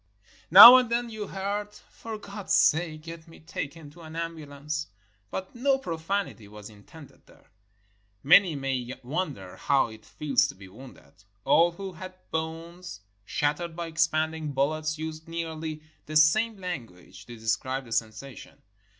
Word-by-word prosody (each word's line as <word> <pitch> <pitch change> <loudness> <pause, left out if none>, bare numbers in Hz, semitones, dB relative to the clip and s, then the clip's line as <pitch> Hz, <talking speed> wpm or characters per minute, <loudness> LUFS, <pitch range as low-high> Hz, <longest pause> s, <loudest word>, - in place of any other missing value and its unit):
Now 230 +9 +12
and 250 -2 +1
then 235 0 -1
you 215 -2 -6
heard, 205 +2 -4
"For 225 -1 -10
God's 200 -1 -5
sake, 155 -1 +2
get 165 0 -10
me 165 - -15
taken 155 -1 -7
to 170 +3 -16
an 160 0 -11
ambulance!" 155 -2 -5 0.2
— 100 -1 -41
but 190 - -6
no 270 +3 +2
profanity 170 - -4
was 105 +1 -12
in 100 -1 -18
tended 160 -4 -16
there. - - -23 0.7
Many 170 +3 +6
may 130 -2 -4
wonder 125 - -4
how 140 -4 +1
it 110 -1 -13
feels 145 -1 0
to 140 - -9
be 95 0 -13
wounded. 95 - -16 0.2
All 170 +1 +4
who 190 +1 -7
had 185 +2 -10 0.2
bones 165 - -6 0.2
shattered 155 - -2
by 170 0 -4
expanding 160 -2 -1
bullets 155 +3 -1
used 160 0 -7
nearly 160 -2 -5 0.2
the 155 - -7
same 210 +9 +4
language 120 - -8
to 120 - -9
describe 115 +4 -2
the 115 - -14
sensation. 115 +2 -5
160 Hz, 150 wpm, -27 LUFS, 135-175 Hz, 0.7 s, Now